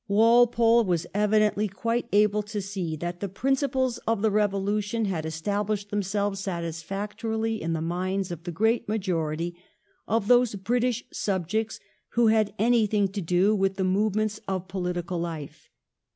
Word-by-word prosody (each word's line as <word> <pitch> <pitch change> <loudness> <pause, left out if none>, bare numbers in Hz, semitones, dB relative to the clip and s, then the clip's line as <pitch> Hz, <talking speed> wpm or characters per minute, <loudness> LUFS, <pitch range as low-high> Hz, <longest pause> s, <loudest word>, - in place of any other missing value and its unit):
Walpole 230 +2 +5
was 175 -4 0
evidently 210 0 +2
quite 230 +5 -2
able 210 +1 +3
to 210 0 -5
see 190 -5 -3
that 175 +3 -5
the 200 - -3
principles 260 +3 0
of 225 -2 +1
the 220 - +3
Eevolution 205 +2 0
had 165 -5 -2
established 205 +5 -2
themselves 200 0 -1
satisfactorily 200 +6 -3
in 165 0 -1
the 160 -1 -2
minds 185 +2 -2
of 170 -1 -7
the 175 - -4
great 225 +6 +1
majority 170 -5 -1 0.5
of 220 -1 0
those 245 -2 +4
British 240 +4 0
subjects 200 +3 -1 0.3
who 235 -1 +4
had 215 -2 +3
any 230 0 +3
thing 205 -1 +1
to 195 +1 -4
do 180 +5 +2
with 195 -1 +1
the 195 - -1
movements 210 +3 +1
of 190 -1 -3
political 180 -2 -3
life. 165 -4 -6
205 Hz, 150 wpm, -26 LUFS, 185-220 Hz, 0.5 s, Walpole